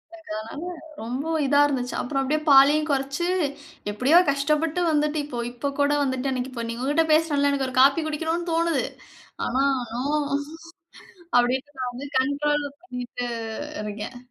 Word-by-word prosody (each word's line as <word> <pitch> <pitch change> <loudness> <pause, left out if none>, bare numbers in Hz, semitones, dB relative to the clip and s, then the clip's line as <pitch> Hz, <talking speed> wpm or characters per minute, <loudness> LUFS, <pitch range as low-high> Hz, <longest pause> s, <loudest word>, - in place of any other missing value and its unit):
அதனால 290 +2 -6 0.3
ரொம்ப 245 +5 -3 0.2
இதா 285 +1 +4
இருந்துச்சு. 250 -3 -2
அப்புறம் 270 +1 -1
அப்டியே 300 +3 0
பாலையும் 285 +3 +6
குறச்சு 275 +4 -1 0.7
எப்டியோ 255 +11 +5
கஷ்டப்பட்டு 300 +4 0
வந்துட்டு 300 0 +1
இப்போ 250 -5 -6
இப்போ 245 +4 -3
கூட 285 0 +3
வந்துட்டு 260 0 -1
அன்னக்கி 255 0 -3
இப்ப 235 -2 -4
நீங்க 235 +2 -4
உங்ககிட்ட 295 +4 +2
பேசுனேன்ல, 300 -3 +3
எனக்கு 275 -2 0
ஒரு 255 - -8
காஃபி 280 +4 +5
குடிக்கணுனு 325 +3 -2
தோணுது. 335 0 +1 0.6
ஆனா 260 +3 +1 0.3
நோ 245 +2 -2 1.4
அப்டின்ட்டு 265 +4 -1
நான் 250 -1 -2
வந்து 265 +4 -7
கண்ட்ரோல் 290 +2 0 0.2
பண்ணிட்டு 245 -6 -5 0.6
இருக்கேன். 210 +4 -6
280 Hz, 140 wpm, -24 LUFS, 250-300 Hz, 1.4 s, பாலையும்